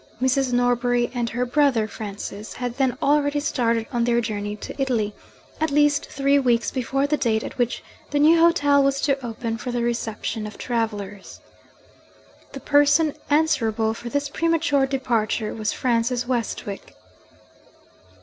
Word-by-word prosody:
Mrs. 260 0 +1
Norbury 245 0 +1
and 240 -2 -1
her 245 +2 -1
brother 250 -4 +2
Francis 205 0 -7
had 245 0 -5
then 260 -2 +1
already 290 0 +2
started 235 -6 0
on 240 -1 +1
their 235 0 +2
journey 210 -2 -3
to 210 - -8
Italy 225 -6 0 0.5
at 315 - +1
least 295 0 +2
three 280 +1 +2
weeks 240 -3 +1
before 270 +2 -1
the 300 +1 0
date 220 -4 0
at - - -8
which 245 -1 -1 0.3
the 290 - -1
new 315 +3 +5
hotel 290 -4 +4
was 275 0 +1
to 275 -2 0
open 230 -1 -4
for 245 - -5
the 240 -1 -1
reception 225 -2 -3
of 210 - -10
travellers. 210 -4 -4 1.1
The - - -6
person 290 +1 +3 0.2
answerable 235 -8 +2
for 235 +1 -7
this 285 +2 -1
premature 315 -3 +1
departure 235 -5 -1
was 215 -1 -2
Francis 240 0 0
Westwick. 230 -5 -4
245 Hz, 150 wpm, -23 LUFS, 225-285 Hz, 1.1 s, new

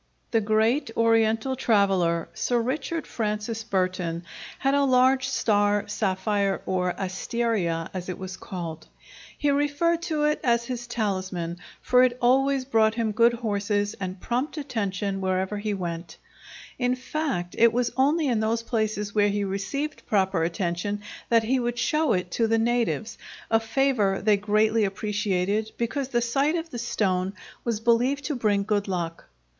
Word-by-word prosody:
The 225 - +3
great 220 +6 +2
Oriental 225 +2 +2
traveller, 195 -9 +2
Sir 245 -1 0
Richard 305 +6 -2
Francis 215 0 -3
Burton, 185 -4 -1 0.3
had 270 -1 +1
a 285 0 +3
large 260 0 +4
star 205 -5 +1
sapphire 200 -1 0
or 180 -1 0
asteria, 190 -3 -1
as 185 -1 -5
it 180 - -4
was 190 0 -6
called. 170 -5 -7 0.5
He 290 - +1
referred 290 +4 +1
to 305 -2 0
it 300 +1 +2
as 235 -1 +2
his 240 -1 -5
talisman, 185 -7 -2 0.2
for 250 0 +5
it 250 -1 +3
always 265 +2 +3
brought 225 -4 +3
him 230 -2 0
good 230 +3 +4
horses 205 -2 -1
and 185 -1 -5
prompt 255 - -2
attention 200 -8 -2
wherever 190 +2 -1
he 210 0 -2
went; 170 -3 -5 0.6
in 250 0 +2
fact, 255 - -3
it 230 0 +6
was 240 0 0
only 295 +5 +2
in 240 -4 +1
those 225 +1 0
places 215 -3 -1
where 205 -1 +3
he 205 0 -1
received 200 +10 -3
proper 190 -4 +2
attention 175 +4 -2 0.3
that 230 -1 +4
he 255 +4 +1
would 240 0 -2
show 305 +6 +2
it 180 -2 -2
to 230 +4 +1
the 225 +1 +2
natives, 230 -1 0 0.3
a 225 - +5
favor 225 -4 +1
they 210 0 +3
greatly 215 +2 +2
appreciated, 205 +1 -1
because 255 +3 -2
the 240 -3 0
sight 275 +7 +1
of 330 -1 -4
the 240 - -5
stone 190 -5 0 0.3
was 230 -3 -1
believed 245 +5 +2
to 300 - -1
bring 210 -4 +1
good 205 -1 0
luck. 170 -3 -3
220 Hz, 155 wpm, -26 LUFS, 195-245 Hz, 0.6 s, it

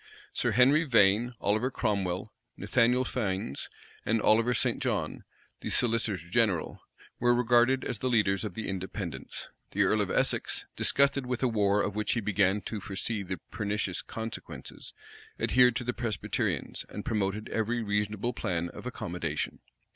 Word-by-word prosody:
Sir - - 0
Henry 135 +6 +5
Vane, 115 -2 +4
Oliver 110 +5 +1
Cromwell, 100 -5 -1 0.2
Nathaniel 125 +1 +2
Fiennes, 95 - -3 0.3
and 115 - +1
Oliver 115 +4 +4
St. - - 0
John, - - -1 0.4
the - - -5
solicitor 115 -4 +2
general, 90 +1 0 0.4
were 120 0 +4
regarded 120 +2 +3
as 120 -4 -3
the 130 - 0
leaders 105 -5 +2
of 105 -5 -5
the 110 - -4
Independents. 95 -1 -5 0.2
The - - +3
earl - - +3
of - - -1
Essex, - - 0
disgusted 140 -1 +2
with 125 0 -2
a - - +4
war 105 -3 +2
of 105 - -2
which 105 0 0
he 120 - 0
began 100 -1 +2
to 105 0 -5
foresee 100 +3 -2
the 95 -1 -4
pernicious 100 -3 -2
consequences, 110 0 -7 0.5
adhered 125 -1 +4
to - - -2
the 125 +1 -2
Presbyterians, 115 -5 -2
and - - -7
promoted 105 0 -1
every 115 +1 -1
reasonable 105 +3 -1
plan 85 -1 -2
of 125 - -8
accommodation. 85 -9 -3
110 Hz, 150 wpm, -29 LUFS, 100-120 Hz, 0.5 s, Henry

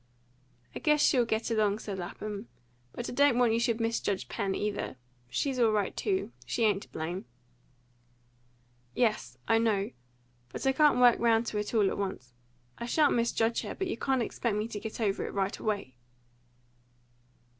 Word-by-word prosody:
"I - - -5
guess 300 0 +3
she'll 250 -4 +4
get 220 +1 -1
along," 210 -2 +2
said 200 -3 -6
Lapham. 205 +4 -6 0.4
"But 240 - -5
I - - -4
don't 280 -1 +4
want 240 -2 +4
you 230 - +2
should 235 -1 +1
misjudge 225 -4 -1
Pen 195 -4 -1
either. 205 -9 -2 0.3
She's 265 - -1
all 230 -2 +4
right 205 -3 0
too. 385 -2 -1
She 235 - -1
ain't 205 -3 +3
to - - -13
blame." 170 +4 -4 1.7
"Yes, 225 -4 0
I 225 0 +4
know. 210 -3 +1 0.6
But - - -6
I 270 - +5
can't 295 +1 +4
work 245 -1 +6
round 230 0 +3
to 210 - -1
it 210 +3 -3
all 210 -3 +4
at - - -2
once. 190 -11 -4 0.5
I 235 - -4
shan't 295 +3 +3
misjudge 230 -1 +1
her, - - -6
but 385 - -2
you 370 - -2
can't 265 -3 0
expect 230 -1 -2
me 210 +1 -1
to 210 - -5
get 220 +2 -6
over 205 -3 0
it - - -5
right 195 0 -1
away." 205 -11 -2
225 Hz, 175 wpm, -30 LUFS, 205-240 Hz, 1.7 s, work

